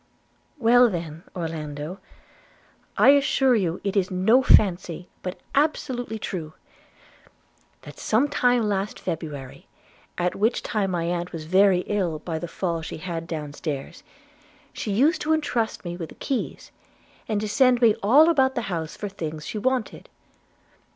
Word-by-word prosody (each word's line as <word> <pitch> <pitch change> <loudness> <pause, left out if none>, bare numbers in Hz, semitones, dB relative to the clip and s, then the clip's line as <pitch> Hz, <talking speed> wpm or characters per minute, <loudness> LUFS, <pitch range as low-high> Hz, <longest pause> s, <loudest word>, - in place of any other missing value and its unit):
'Well 245 -1 +5
then, 165 -4 -5
Orlando, 160 0 -5 1.0
I - - +6
assure 275 -2 +4
you 180 -5 0
it 200 0 -2
is 190 -2 +2
no 195 +8 +4
fancy, 180 -7 +3
but 180 0 -5
absolutely 260 -6 0
true, 165 -7 -5 1.3
that - - -12
some 235 +7 +2
time 245 -4 +2
last 200 0 -2
February, 150 -6 -6 0.5
at 180 0 0
which 220 +4 +1
time 210 -4 -1
my 175 -2 -1
aunt 175 +1 -2
was 165 -2 -6
very 185 +2 +4
ill 185 -6 -1
by 160 +1 -4
the 175 - -5
fall 170 -1 -3
she 160 - -6
had 165 0 -5
down 150 -3 -5
stairs, 145 -3 -5 0.7
she 210 - -4
used 280 - +3
to 315 +1 +1
intrust 245 -10 -1
me 175 0 -4
with 170 -2 -6
the - - -13
keys, 265 -3 -4 0.6
and 215 -2 0
to 215 - -3
send 250 +3 +4
me 230 -3 +5
all 275 +10 +6
about 265 -5 +3
the 240 - 0
house 160 -2 -4
for 205 - -4
things 160 -6 -6
she 215 - -4
wanted. 255 0 -2
195 Hz, 150 wpm, -24 LUFS, 165-240 Hz, 1.3 s, I